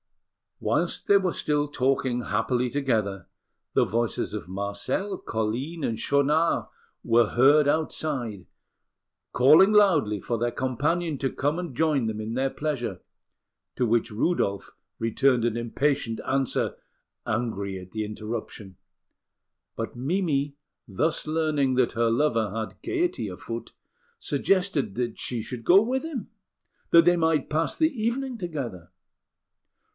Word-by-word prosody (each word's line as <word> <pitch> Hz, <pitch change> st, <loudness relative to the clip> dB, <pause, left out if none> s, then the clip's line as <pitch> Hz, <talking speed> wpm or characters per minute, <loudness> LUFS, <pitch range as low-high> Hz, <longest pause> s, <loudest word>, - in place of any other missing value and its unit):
Whilst -, -, -1 dB
they 200 Hz, -, +7 dB
were 190 Hz, -2 st, 0 dB
still 150 Hz, -1 st, 0 dB
talking 130 Hz, -3 st, 0 dB
happily 115 Hz, +4 st, 0 dB
together, 110 Hz, -9 st, -1 dB, 0.5 s
the -, -, +4 dB
voices 115 Hz, -1 st, -1 dB
of 100 Hz, -4 st, -6 dB
Marcel, 100 Hz, -, -3 dB
Colline, 120 Hz, +9 st, -3 dB
and 115 Hz, -1 st, -1 dB
Schaunard 145 Hz, +6 st, +2 dB, 0.4 s
were 115 Hz, -1 st, +4 dB
heard 140 Hz, +4 st, +5 dB
outside, 140 Hz, -, -1 dB, 0.9 s
calling 155 Hz, -, +6 dB
loudly 160 Hz, -, +4 dB
for 115 Hz, +5 st, -2 dB
their 120 Hz, +1 st, 0 dB
companion 145 Hz, +6 st, -1 dB
to 135 Hz, -, -1 dB
come 145 Hz, +4 st, -1 dB
and 175 Hz, -7 st, -5 dB
join 150 Hz, -4 st, +2 dB
them 110 Hz, -1 st, -3 dB
in 110 Hz, +1 st, -4 dB
their 135 Hz, +1 st, +1 dB
pleasure, 145 Hz, -5 st, -3 dB, 0.7 s
to 125 Hz, -, +1 dB
which 115 Hz, +1 st, +1 dB
Rudolf 105 Hz, -, -1 dB, 0.3 s
returned 120 Hz, +2 st, +2 dB
an 115 Hz, -1 st, 0 dB
impatient 120 Hz, 0 st, -1 dB
answer, 135 Hz, -1 st, 0 dB, 0.5 s
angry 110 Hz, -5 st, -2 dB
at 90 Hz, 0 st, -12 dB
the 110 Hz, -1 st, -2 dB
interruption; 105 Hz, -3 st, -6 dB, 1.0 s
but -, -, -5 dB
Mimi, 145 Hz, 0 st, -1 dB, 0.3 s
thus 150 Hz, -, -1 dB
learning 155 Hz, -4 st, +1 dB
that 125 Hz, -1 st, +2 dB
her 115 Hz, 0 st, +2 dB
lover 115 Hz, -4 st, +1 dB
had 110 Hz, -1 st, -5 dB
gaiety 360 Hz, 0 st, -1 dB
afoot, -, -, -7 dB, 0.5 s
suggested 180 Hz, -, 0 dB
that 120 Hz, -2 st, -3 dB
she 120 Hz, -3 st, -2 dB
should 120 Hz, 0 st, -7 dB
go 190 Hz, +8 st, +7 dB
with 255 Hz, +5 st, -1 dB
him, 310 Hz, -8 st, -5 dB, 0.6 s
that 165 Hz, -1 st, +7 dB
they 175 Hz, 0 st, +5 dB
might 160 Hz, -3 st, +1 dB
pass 160 Hz, +2 st, 0 dB
the 315 Hz, -1 st, +3 dB
evening 245 Hz, +2 st, -2 dB
together. 130 Hz, -, -5 dB
130 Hz, 130 wpm, -26 LUFS, 115-160 Hz, 1.0 s, they